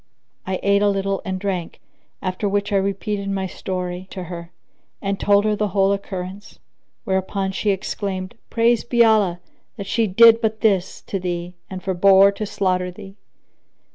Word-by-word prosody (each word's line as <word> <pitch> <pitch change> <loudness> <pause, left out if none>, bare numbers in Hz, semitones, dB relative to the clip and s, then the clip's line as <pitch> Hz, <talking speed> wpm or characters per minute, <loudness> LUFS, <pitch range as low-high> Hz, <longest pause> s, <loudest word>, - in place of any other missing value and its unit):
I 190 -1 -1
ate 200 0 +3
a 205 - +4
little 195 0 -1
and 190 -1 -2
drank, 185 -4 -3 0.4
after 185 +2 -1
which 205 +1 -1
I - - +4
repeated 200 +1 -2
my 195 -1 -1
story 180 -1 -5
to 185 - -6
her, 170 -1 -8 0.5
and 195 -1 -2
told 205 0 +3
her 215 -1 +2
the 210 0 0
whole 195 0 +2
occurrence; 195 0 -6 0.5
whereupon 190 0 -1
she 205 +2 -1
exclaimed, 190 -1 -3 0.2
"Praised 235 0 +2
be 235 -1 +5
Allah, 205 -6 +3 0.4
that 200 - -5
she 225 +3 +1
did 230 +4 +7
but 220 -1 -1
this 195 -4 +1
to 195 - -3
thee 175 -1 -4 0.2
and 185 -1 -7
forbore 195 +1 +5
to 205 +1 -5
slaughter 185 -2 0
thee!" 195 +2 -11
195 Hz, 165 wpm, -21 LUFS, 185-205 Hz, 0.5 s, did